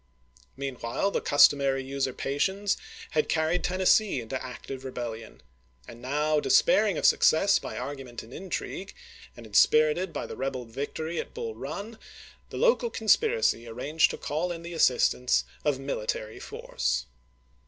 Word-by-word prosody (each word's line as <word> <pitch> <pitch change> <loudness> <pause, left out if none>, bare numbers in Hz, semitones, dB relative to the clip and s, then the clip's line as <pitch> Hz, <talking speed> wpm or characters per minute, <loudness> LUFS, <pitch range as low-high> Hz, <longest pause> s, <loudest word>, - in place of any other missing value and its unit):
Meanwhile 135 +6 -2
the - - -1
customary 140 -2 +4
usurpations 140 +8 -1 0.4
had 155 -1 +1
carried 160 +2 +1
Tennessee 185 -1 +3
into 125 +3 -5
active 130 +1 -8
rebellion; 120 -4 -7 0.4
and 120 - -11
now, 150 +4 +1
despairing 205 +4 +3
of - - -1
success 195 +5 +5
by - - -7
argument 135 -4 -6
and 115 +3 -14
intrigue, 190 +1 -5 0.4
and 120 - -10
inspirited 155 - +3
by - - -4
the - - -7
rebel 130 -2 -3
victory 145 +7 -4
at - - -6
Bull 460 -1 -4
Run, 220 - -7 0.5
the - - -7
local 480 0 +3
conspiracy 435 - +2
arranged 140 +8 +1
to - - -5
call 160 +5 -2
in 170 -1 -6
the 170 +1 -7
assistance 125 -4 +3 0.2
of 145 -3 +1
military 110 -5 -4
'Si"^^"y - - -9
foi'ce. 60 0 -1
145 Hz, 140 wpm, -27 LUFS, 125-180 Hz, 0.5 s, success